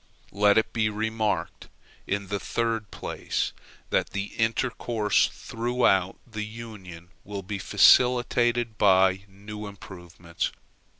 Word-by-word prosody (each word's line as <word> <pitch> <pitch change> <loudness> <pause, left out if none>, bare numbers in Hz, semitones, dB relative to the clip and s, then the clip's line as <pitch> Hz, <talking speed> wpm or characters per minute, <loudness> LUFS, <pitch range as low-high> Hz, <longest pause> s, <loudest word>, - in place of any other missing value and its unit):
Let 100 +1 +4
it 110 - +1
be 110 -2 +1
remarked, 110 0 -2 0.4
in 100 -1 -2
the 100 0 -1
third 115 -2 -2
place, - - -3 0.4
that - - +1
the 100 0 -4
intercourse 115 -1 +1
throughout 115 -6 0
the 110 -3 -5
Union 105 -7 -10
will 100 -1 -6
be 100 +1 -5
facilitated 120 -1 +4
by 95 -1 +4
new 105 +2 -9
improvements. 90 -4 -6
105 Hz, 110 wpm, -26 LUFS, 95-115 Hz, 0.4 s, Let